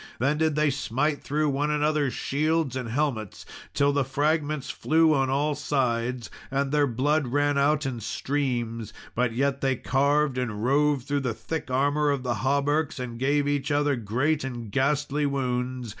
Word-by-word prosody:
Then 140 Hz, +5 st, +1 dB
did 160 Hz, -2 st, +2 dB
they 150 Hz, -1 st, +2 dB
smite 140 Hz, +3 st, -1 dB
through 150 Hz, +1 st, 0 dB
one 145 Hz, +2 st, 0 dB
another's 150 Hz, -2 st, +1 dB
shields 155 Hz, -1 st, 0 dB
and 125 Hz, -3 st, -4 dB
helmets 120 Hz, -6 st, -2 dB, 0.3 s
till 140 Hz, 0 st, +3 dB
the 140 Hz, -1 st, +2 dB
fragments 150 Hz, +2 st, -1 dB
flew 160 Hz, 0 st, +3 dB
on 135 Hz, -2 st, +1 dB
all 145 Hz, +3 st, +1 dB
sides, 125 Hz, -4 st, -1 dB, 0.2 s
and 135 Hz, 0 st, -1 dB
their 145 Hz, -1 st, +3 dB
blood 140 Hz, +4 st, +1 dB
ran 145 Hz, +3 st, +1 dB
out 145 Hz, +1 st, +2 dB
in 130 Hz, -3 st, -3 dB
streams; 120 Hz, -2 st, -2 dB, 0.2 s
but 120 Hz, -1 st, 0 dB
yet 140 Hz, +2 st, 0 dB
they 135 Hz, -1 st, +1 dB
carved 140 Hz, +1 st, +1 dB
and 110 Hz, -4 st, -3 dB
rove 145 Hz, 0 st, +2 dB
through 145 Hz, +2 st, -1 dB
the 125 Hz, -5 st, -2 dB
thick 160 Hz, +2 st, -5 dB
armour 145 Hz, +3 st, +2 dB
of 140 Hz, -3 st, 0 dB
the 125 Hz, -2 st, -1 dB
hauberks, 140 Hz, +2 st, +1 dB
and 120 Hz, -2 st, -5 dB
gave 145 Hz, +2 st, +1 dB
each 145 Hz, 0 st, -1 dB
other 145 Hz, -1 st, +2 dB
great 130 Hz, +7 st, 0 dB
and 120 Hz, -5 st, -6 dB
ghastly 145 Hz, +2 st, +1 dB
wounds. 125 Hz, -2 st, -2 dB
140 Hz, 170 wpm, -26 LUFS, 125-150 Hz, 0.3 s, till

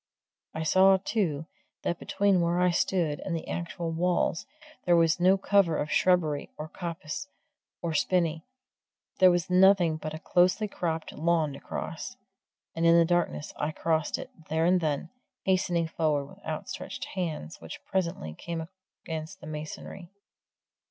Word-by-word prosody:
I 160 Hz, -, -2 dB
saw, 190 Hz, +4 st, +6 dB
too, 185 Hz, -7 st, -1 dB, 0.4 s
that 175 Hz, -, -1 dB
between 200 Hz, -3 st, +2 dB
where 170 Hz, +1 st, +1 dB
I 180 Hz, 0 st, +4 dB
stood 170 Hz, -4 st, 0 dB
and 180 Hz, -, -3 dB
the 165 Hz, -, -5 dB
actual 170 Hz, -1 st, -3 dB
walls 170 Hz, 0 st, 0 dB, 0.4 s
there 175 Hz, -, +4 dB
was 165 Hz, -1 st, +3 dB
no 185 Hz, +2 st, +5 dB
cover 195 Hz, -4 st, +3 dB
of 150 Hz, -, -2 dB
shrubbery 160 Hz, -6 st, +2 dB
or 155 Hz, -, -5 dB
coppice 170 Hz, -, -5 dB, 0.6 s
or 170 Hz, -1 st, -1 dB
spinny 165 Hz, 0 st, +1 dB, 0.8 s
there 185 Hz, -, +8 dB
was 175 Hz, 0 st, 0 dB
nothing 180 Hz, -3 st, +5 dB
but 155 Hz, 0 st, -5 dB
a -, -, -4 dB
closely 180 Hz, +6 st, +2 dB
cropped 165 Hz, -4 st, -3 dB
lawn 160 Hz, -2 st, +1 dB
to 140 Hz, -, -9 dB
cross. -, -, -6 dB, 0.6 s
And 165 Hz, -, -2 dB
in 165 Hz, 0 st, +6 dB
the 170 Hz, -, +6 dB
darkness 175 Hz, -3 st, 0 dB
I 150 Hz, -, -1 dB
crossed 160 Hz, -2 st, 0 dB
it, -, -, -8 dB, 0.2 s
there 160 Hz, +1 st, +1 dB
and 180 Hz, +1 st, +4 dB
then, 155 Hz, +1 st, -1 dB, 0.3 s
hastening 175 Hz, -3 st, +1 dB
forward 155 Hz, -3 st, 0 dB
with 140 Hz, -, -16 dB
outstretched -, -, -5 dB
hands 160 Hz, -, -4 dB
which 80 Hz, -, -9 dB
presently 170 Hz, -, -2 dB
came 165 Hz, -, -5 dB, 0.4 s
against 160 Hz, +3 st, -5 dB
the -, -, -11 dB
masonry. 155 Hz, +4 st, -7 dB
170 Hz, 150 wpm, -28 LUFS, 155-180 Hz, 0.8 s, there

